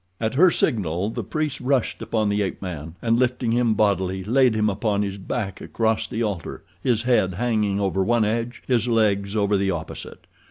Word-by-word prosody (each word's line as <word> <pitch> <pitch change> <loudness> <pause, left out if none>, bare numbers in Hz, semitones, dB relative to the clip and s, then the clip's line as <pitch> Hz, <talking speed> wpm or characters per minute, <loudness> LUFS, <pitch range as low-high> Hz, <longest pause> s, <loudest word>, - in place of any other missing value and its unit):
At 110 +1 -1
her 175 +7 +6
signal 100 - 0
the 120 0 -4
priests 155 +6 -3
rushed 130 -1 0
upon 110 -2 0
the 105 0 +1
ape 95 -3 -2
man, 80 -4 -6
and, 115 0 +2
lifting 125 -2 +1
him 120 -2 +2
bodily, 95 -3 +1
laid 125 +2 +3
him 110 0 +2
upon 105 0 0
his 100 0 -4
back 95 0 -4
across 110 -1 0
the 115 - -2
altar, 100 -7 -4 0.2
his 120 -3 +1
head 105 -7 +2
hanging 105 -3 0
over 95 -1 +1
one 115 +2 +2
edge, 115 +3 -2
his 125 -2 +1
legs 105 -3 +1
over 105 -1 +2
the 100 0 +1
opposite. 85 -4 -6
110 Hz, 190 wpm, -23 LUFS, 100-120 Hz, 0.2 s, her